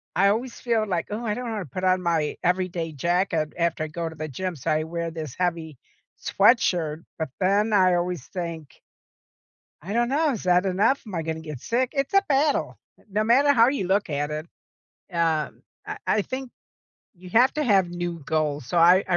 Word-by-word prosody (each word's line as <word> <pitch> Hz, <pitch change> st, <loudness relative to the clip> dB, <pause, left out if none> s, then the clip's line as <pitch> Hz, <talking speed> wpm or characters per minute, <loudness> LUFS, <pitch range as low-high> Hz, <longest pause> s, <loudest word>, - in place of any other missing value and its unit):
I 195 Hz, +3 st, +4 dB
always 235 Hz, +4 st, -2 dB
feel 225 Hz, -3 st, 0 dB
like, 180 Hz, +1 st, -2 dB
"Ooh, 225 Hz, +3 st, -3 dB
I 210 Hz, -2 st, 0 dB
don't 245 Hz, -1 st, -4 dB
wanna 210 Hz, -4 st, -3 dB
put 185 Hz, +8 st, -6 dB
on 185 Hz, 0 st, +3 dB
my 165 Hz, -4 st, 0 dB
everyday 180 Hz, -2 st, -1 dB
jacket 170 Hz, +1 st, 0 dB
after 170 Hz, -2 st, 0 dB
I 155 Hz, -, -3 dB
go 165 Hz, +2 st, -4 dB
to 160 Hz, -, -11 dB
the 155 Hz, 0 st, -5 dB
gym," 180 Hz, +5 st, -4 dB
so 155 Hz, +3 st, -2 dB
I 155 Hz, 0 st, +1 dB
wear 170 Hz, 0 st, -4 dB
this 155 Hz, -5 st, -6 dB
heavy 165 Hz, -5 st, -2 dB, 0.4 s
sweatshirt. 175 Hz, -8 st, +2 dB, 0.2 s
But 160 Hz, -, -2 dB
then 205 Hz, +3 st, +2 dB
I 185 Hz, -2 st, +5 dB
always 175 Hz, -5 st, -2 dB
think 170 Hz, -5 st, -6 dB, 1.0 s
"I 205 Hz, -, -5 dB
dunno. 275 Hz, +6 st, +2 dB
Is 225 Hz, -, -5 dB
that 180 Hz, +1 st, +3 dB
enough? 205 Hz, +9 st, +2 dB
Am 205 Hz, -, -8 dB
I 165 Hz, -, -1 dB
gonna 160 Hz, 0 st, -4 dB
get 150 Hz, -5 st, -8 dB
sick?" 245 Hz, -, 0 dB
It's 275 Hz, +2 st, -1 dB
a 390 Hz, -, +6 dB
battle. 290 Hz, +1 st, +1 dB, 0.3 s
No 210 Hz, +2 st, +1 dB
matter 275 Hz, +5 st, +5 dB
how 235 Hz, -3 st, +5 dB
you 265 Hz, -9 st, -1 dB
look 195 Hz, -1 st, +1 dB
at 145 Hz, +1 st, -1 dB
it. 155 Hz, +1 st, -4 dB, 0.7 s
Um, 160 Hz, -2 st, 0 dB, 0.2 s
I 420 Hz, -, -5 dB
I 215 Hz, -, +2 dB
think 260 Hz, +3 st, -6 dB, 0.6 s
you 180 Hz, 0 st, -13 dB
have 245 Hz, +6 st, +5 dB
to 300 Hz, -, 0 dB
have 195 Hz, -8 st, +3 dB
new 175 Hz, -1 st, -4 dB
goals. 150 Hz, -4 st, -1 dB
So, 170 Hz, -, 0 dB
I 180 Hz, +3 st, +6 dB
I 175 Hz, -, +3 dB
180 Hz, 195 wpm, -25 LUFS, 160-215 Hz, 1.0 s, a